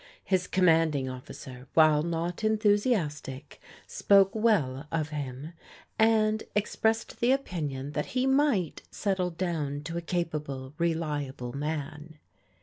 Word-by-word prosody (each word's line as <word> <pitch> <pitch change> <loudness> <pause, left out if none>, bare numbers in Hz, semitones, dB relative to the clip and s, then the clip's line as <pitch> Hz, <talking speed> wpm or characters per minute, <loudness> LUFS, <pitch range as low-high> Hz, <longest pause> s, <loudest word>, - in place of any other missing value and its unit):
His 185 -1 0
Commanding 160 -6 +3
Of 130 0 -7
ficer, 125 0 -10
while 155 -2 +6
not 170 +4 -3
enthusiastic, 205 - 0 0.2
spoke 195 -1 +4
well 155 - +1
of 155 -2 -1
him, 145 +1 -6 0.5
and 220 -1 +3
ex 210 0 -1
pressed 225 0 0
the 240 +2 +3
opinion 150 - -2
that 150 0 -2
he 255 - +2
might 265 - +2
settle 190 -3 -1
down 160 -5 -3
to 165 +3 -5
a - - -2
ca 175 +1 0
pable, 140 -4 -6
reliable 150 -7 -2
man. 150 +1 -5
165 Hz, 130 wpm, -28 LUFS, 145-200 Hz, 0.5 s, while